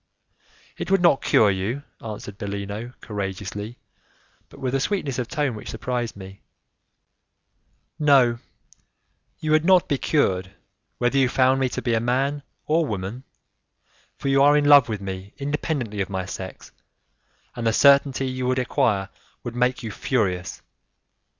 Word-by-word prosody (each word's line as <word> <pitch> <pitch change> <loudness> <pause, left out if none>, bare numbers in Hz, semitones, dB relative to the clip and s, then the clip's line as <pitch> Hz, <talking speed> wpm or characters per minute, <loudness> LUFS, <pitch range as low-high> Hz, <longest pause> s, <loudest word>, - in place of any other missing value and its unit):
"It - - -5
would 195 -1 +3
not 170 -6 +5
cure 105 -2 +4
you," 105 +9 -3 0.2
answered 105 -2 -7
Bellino, 100 +3 -5
courageously, 105 +2 -5 0.7
but - - -15
with 130 -1 -2
a 135 - +2
sweetness 145 - -1
of 120 - -2
tone 145 -4 -1
which 105 - -8
surprised 120 +1 -3
me; 95 0 -11 1.6
"no, 135 -6 +4 1.0
you 155 - -3
would 155 0 +4
not 185 0 +4
be 140 - 0
cured, 95 - 0 0.4
whether 125 +3 +1
you 130 -2 +3
found 130 +1 +3
me 130 -1 +1
to - - -5
be 115 -2 +1
man 135 +5 0 0.2
or 160 +2 +2
woman, 105 +1 -5 0.9
for - - -5
you 135 0 +4
are 145 +1 +6
in 145 - +2
love 145 -4 +7
with 105 -2 -3
me 95 0 -7
independently 140 -7 -2
of 95 - -2
my 95 -1 -3
sex, 95 0 -8 0.8
and 120 -2 -2
the - - +4
certainty 140 +1 +4
you 130 -1 -3
would 130 0 +1
acquire 105 -6 +1 0.3
would 120 - -5
make 125 +1 0
you 110 - -4
furious. 95 -8 -2
125 Hz, 150 wpm, -23 LUFS, 100-140 Hz, 1.6 s, love